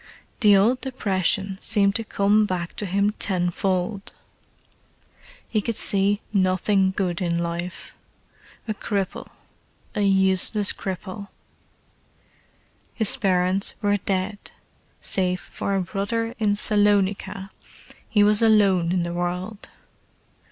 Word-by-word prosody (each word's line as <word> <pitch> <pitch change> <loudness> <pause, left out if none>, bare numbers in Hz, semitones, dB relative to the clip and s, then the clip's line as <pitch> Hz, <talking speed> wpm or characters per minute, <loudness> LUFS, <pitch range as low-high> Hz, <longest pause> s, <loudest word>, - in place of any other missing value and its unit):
The 205 -4 +6
old 235 +6 +2
depression 195 -6 -1
seemed 200 -3 +2
to 225 - -1
come 210 0 +2
back 175 -3 -4
to 205 - -4
him 200 +3 +1
tenfold. 190 0 -1 1.3
He 215 - 0
could 230 +2 -3
see 200 +1 +2
nothing 190 0 +2
good 190 -2 -2
in 170 -2 0
life: 170 +1 -5 0.7
a 215 - -1
cripple, 200 -2 -3 0.7
a 210 - -2
useless 195 +1 +3
cripple. 190 +1 -6 1.7
His 220 -4 +1
parents 185 0 +1
were 205 -2 +1
dead; 195 +1 -2 0.6
save 185 -1 -1
for 200 - -4
a 190 - 0
brother 225 +5 -3
in 210 -2 +2
Salonica, 205 -2 +1 0.6
he 210 -2 +3
was 210 +1 +4
alone 200 -6 +4
in 180 -1 +1
the 170 0 -4
world. 180 +4 -4
195 Hz, 110 wpm, -23 LUFS, 185-210 Hz, 1.7 s, The